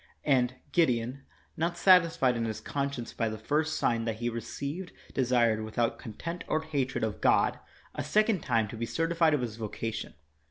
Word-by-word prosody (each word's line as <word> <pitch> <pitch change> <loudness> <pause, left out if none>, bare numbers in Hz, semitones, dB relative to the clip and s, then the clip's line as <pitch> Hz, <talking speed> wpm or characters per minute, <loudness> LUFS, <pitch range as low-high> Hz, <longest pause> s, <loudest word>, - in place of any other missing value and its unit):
And 125 -3 +3 0.2
Gideon, 130 -5 +1 0.3
not 170 +2 -1
satisfied 170 -9 +5
in 115 -1 -1
his 110 -1 -3
conscience 140 -4 -3
by 115 -1 0
the 110 - -5
first 150 +8 0
sign 115 -1 +1
that 115 -1 -1
he 120 +2 -2
received, 140 - -5 0.2
desired, 120 -4 +2
without 115 +2 -1
contempt 165 - -6
cr 155 - +1
hatred 140 -7 -2
of 110 -2 -2
God, - - +3 0.3
a - - -3
second 210 - +2
time 115 -6 +1
to - - -7
be 115 +1 -3
certified 165 0 +2
of 140 - -1
his 115 -2 -4
voca 115 +1 -3
tion. 110 - -6
125 Hz, 175 wpm, -29 LUFS, 115-160 Hz, 0.3 s, satisfied